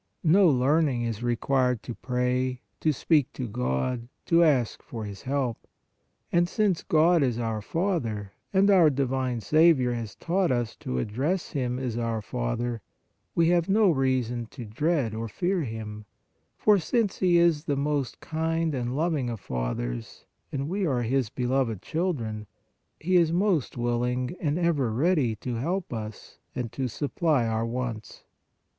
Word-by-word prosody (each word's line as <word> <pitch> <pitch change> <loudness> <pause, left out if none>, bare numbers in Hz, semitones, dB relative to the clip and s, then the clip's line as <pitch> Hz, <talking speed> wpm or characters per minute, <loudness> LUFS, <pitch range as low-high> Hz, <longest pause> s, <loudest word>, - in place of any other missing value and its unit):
No 180 +3 +6
learning 135 -1 +2
is 115 -2 -3
required 125 0 +1
to 120 - -5
pray, 125 +1 -1 0.2
to 155 - +2
speak 150 -1 +2
to 125 - -4
God, 115 - -2 0.2
to 170 0 +5
ask 135 -8 +2
for 115 -3 -7
His 100 -2 -8
help. 130 -3 -2 0.6
And 175 0 +3
since 205 -5 +1
God 165 +2 +4
is 125 -4 +1
our 115 -2 -2
Father, 120 - -2 0.2
and 200 +1 +4
our 175 -5 +6
divine 130 -3 -1
Saviour 150 - +4
has 115 -4 -5
taught 180 -1 0
us 120 -2 -1
to 65 - -4
address 135 - -1
Him 125 -4 -1
as 125 -3 -3
our 115 -1 -1
Father, 110 - -3 0.5
we 165 0 +4
have 175 0 +2
no 205 -1 +5
reason 130 -4 0
to 120 +1 -9
dread 130 +2 0
or 115 +1 -3
fear 180 - -1
Him, 110 -4 -6 0.5
for 210 -2 +4
since 205 +4 0
He 180 -2 +4
is 170 -3 +3
the 145 - 0
most 140 -3 -1
kind 160 0 -1
and 125 -1 -2
loving 155 -6 0
of 115 -3 -4
fathers - - -4 0.3
and 140 0 -2
we 195 +4 -1
are 130 -8 +1
His 125 0 0
beloved 125 -3 0
children, 120 - -2 0.5
He 180 +3 +2
is 165 -2 +4
most 175 - +1
willing 125 +3 -1
and 150 -1 0
ever 160 -9 +1
ready 135 -2 +2
to 120 +3 -4
help 175 +6 -2
us 110 -2 -7 0.2
and 120 -3 -3
to 135 -2 -2
supply 145 +1 0
our 115 0 -1
wants. 115 -3 -5
130 Hz, 155 wpm, -27 LUFS, 115-165 Hz, 0.6 s, No